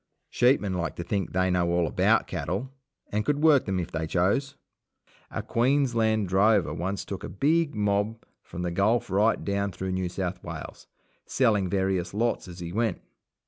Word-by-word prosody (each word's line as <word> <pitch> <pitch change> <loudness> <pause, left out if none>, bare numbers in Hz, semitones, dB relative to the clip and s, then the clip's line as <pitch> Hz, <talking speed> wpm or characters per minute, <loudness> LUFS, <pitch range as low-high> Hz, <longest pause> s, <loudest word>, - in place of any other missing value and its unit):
Sheepmen 120 -6 +3
like 85 -2 -2
to 85 - -5
think 95 +1 -1
that 90 - -1
they 95 0 +2
know 90 -1 +1
all 85 0 +2
about - - +2
cattle, 100 +11 -3 0.4
and 105 +1 0
could 145 +5 0
work 150 -4 +5
them 95 -2 -1
if 85 - -4
they 80 0 -3
chose. 100 - 0 0.7
A - - -4
Queensland 115 -5 +1
drover 95 -3 +3
once 95 +4 -3
took 100 -1 -6
a - - -5
big 155 +6 +1
mob 105 +2 0 0.2
from 90 - -7
the 90 - -1
Gulf 100 +4 +1
right 105 +4 +2
down 100 0 -1
through 95 +1 -4
New 95 -1 -1
South 90 0 -4
Wales, - - -8 0.4
selling 105 -8 +2
various 95 -1 -1
lots 115 -2 0
as 90 -1 -10
he 85 0 -6
went. 110 -3 0
100 Hz, 180 wpm, -27 LUFS, 90-115 Hz, 0.7 s, work